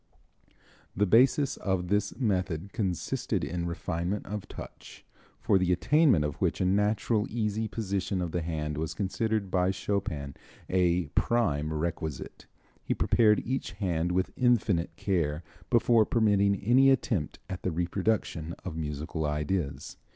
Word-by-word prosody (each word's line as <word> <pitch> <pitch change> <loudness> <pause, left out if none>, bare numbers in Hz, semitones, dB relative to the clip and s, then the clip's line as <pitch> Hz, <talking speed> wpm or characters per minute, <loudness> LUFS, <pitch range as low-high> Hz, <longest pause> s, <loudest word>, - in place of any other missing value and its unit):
The 105 - +3
basis 130 +7 +4
of 95 -3 -1
this 105 0 0
method 95 - -1
consisted 95 -7 -2
in 85 0 -3
refinement 85 +3 -3
of 105 0 -5
touch, - - -11 0.3
for 95 - +3
the 90 -1 +1
attainment 100 - +4
of 75 - -2
which - - +1
a 95 - +1
natural, 105 +3 +1
easy 110 -1 -1
position 100 -3 -2
of 90 -2 -2
the 90 - -1
hand 75 -2 -3
was 80 0 -3
considered 105 +1 -1
by 90 0 +2
Chopin 95 -7 -2 0.3
a 90 -3 +1
prime 80 -11 +1
requisite. 80 -2 -4 0.4
He - - -1
prepared 105 -3 +3
each 130 +3 -3
hand 90 -4 -1
with 95 +1 0
infinite 110 -9 +1
care 85 -5 -1 0.3
before 115 -2 +4
permitting 100 -3 +3
any 130 +5 +5
attempt 110 - 0
at 95 - -6
the - - -1
reproduction 85 -1 -1
of 90 -4 -5
musical 80 +1 -4
ideas. 75 -1 -2
95 Hz, 135 wpm, -29 LUFS, 80-105 Hz, 0.4 s, any